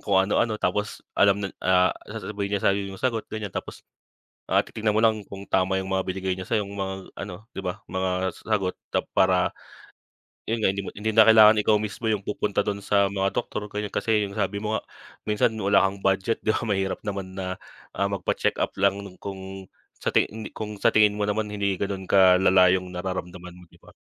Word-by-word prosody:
kung 100 -2 +1
ano-ano, 110 +2 +1
tapos 105 +2 -2
alam 100 -1 +4
nan 95 - -4
ah, 90 0 +3 0.2
sasabihin 100 -1 -4
niya - - -5
sa'yo 100 +1 +3
yung 95 - -8
sagot 115 -4 -1
ganyan. 110 -3 -5
Tapos, - - -7 0.7
ah, - - +3
titignan 110 -1 -1
mo - - +3
lang 110 -2 +3
kung 100 0 -8
tama 95 0 +1
yung 95 0 -3
mga 95 - +2
binigay 95 0 -1
niya 95 0 -6
sa'yo 110 -3 +1
yung 100 - -9
mga 95 -1 -2 0.3
ano, 100 +2 -8
'di 95 - -5
ba, 90 -1 -4
mga 95 -1 -1
sagot 100 -4 0 0.2
tap - - -1
para 95 -1 +3 0.9
yun 115 +1 -2
nga 95 -3 +2
hindi 100 - -3
mo - - -6
hindi 110 +2 -3
na 110 - +9
kailangan 110 0 +8
ikaw 105 0 +4
mismo 110 +2 -3
yung 105 -2 -2
pupunta 105 0 -1
dun 100 -1 -2
sa 100 0 +3
mga 95 0 0
doktor, 105 +1 -4
ganon, 105 0 -4
kasi 110 -2 +1
yung 100 - -9
sabi 100 -1 -1
mo 105 +1 -2
nga, - - -1 0.4
minsan 105 +2 +1
wala 100 -2 +3
kang 95 0 -5
budget, 95 +3 +1
di - - +1
ba, - - +1
mahirap 95 -2 -1
naman 100 -2 -4
na, 95 -1 -3 0.4
ah, 100 0 0
magpacheck-up 100 -3 -1
lang, 100 0 +2
lalo 90 - -12
kung 95 -1 -8 0.3
sa - - 0
ti - - +3
hindi 110 +1 -8
kung 105 -1 -7
sa - - +5
tingin 105 -1 +4
mo 105 - -3
naman 105 +1 0
hindi 100 -2 -1
ganon 100 -2 -4
kalala 95 -1 +6
yong 90 -1 -3
nararamdaman 90 -1 -5
mo, 90 - -15
'di - - -21
ba? - - -19
100 Hz, 210 wpm, -25 LUFS, 95-105 Hz, 0.9 s, na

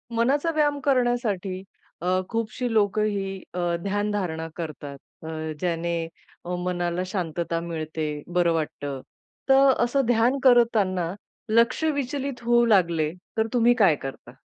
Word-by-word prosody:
मनाचा 285 +8 +2
व्यायाम 295 -2 +2
करण्यासाठी 240 -8 0 0.4
अ, 180 - -3 0.2
खूपशी 230 +2 -2
लोकं 210 -1 +2
ही 195 -2 -2
अ, 180 - -3 0.2
ध्यानधारणा 200 -5 -2
करतात. 150 -4 -6 0.3
अ, - - -7 0.3
ज्याने 170 -1 -1 0.6
मनाला 175 0 -1
शांतता 170 -3 -2
मिळते, 160 -2 -4 0.3
बरं 175 -1 +3
वाटतं. 145 -4 -3 0.5
तर 270 0 +7
असं 265 +3 +1
ध्यान 245 +3 +3
करताना 210 -9 +3 0.4
लक्ष 230 +7 +3
विचलित 280 -4 -2
होऊ 240 0 +4
लागले, 170 -8 +3 0.3
तर 220 0 +2
तुम्ही 240 0 +5
काय 190 -8 +5
करता? 135 -3 -8
200 Hz, 120 wpm, -25 LUFS, 170-240 Hz, 0.6 s, तर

